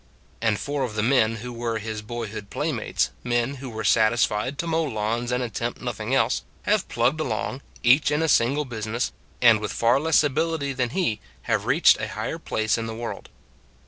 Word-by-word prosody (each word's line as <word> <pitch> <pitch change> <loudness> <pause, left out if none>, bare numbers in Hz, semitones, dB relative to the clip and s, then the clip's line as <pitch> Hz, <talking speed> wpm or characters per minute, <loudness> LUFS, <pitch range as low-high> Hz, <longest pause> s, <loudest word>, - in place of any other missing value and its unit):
And 110 -2 +2
four 145 0 -2
of 120 -5 -2
the 105 - 0
men 115 -2 +3
who 125 - -5
were 115 -1 -2
his 110 0 -5
boyhood 110 -2 -6
play - - -1
mates - - -1
men 120 +3 0
who 130 0 -7
were 110 -1 -5
satisfied 110 +3 +2
to - - -2
mow 165 0 +1
lawns 115 -2 -2
and 125 0 0
attempt 115 -3 -3
nothing - - -2
else 60 - +2 0.2
have - - +1
plugged 120 +6 +1
along, 110 -2 -2 0.2
each 130 +6 +5
in 150 +2 +1
a - - +2
single 140 +2 +3
business, 115 0 -3 0.3
and 115 -3 +7
with 105 - -3
far 120 +3 +3
less 160 +1 +4
ability 150 0 0
than 125 -2 -1
he, 145 - 0 0.2
have - - 0
reached - - +5
a - - -2
higher - - -4
place 110 +1 0
in 115 - -3
the 110 - -5
world. 115 +1 -6
120 Hz, 195 wpm, -24 LUFS, 110-140 Hz, 0.3 s, and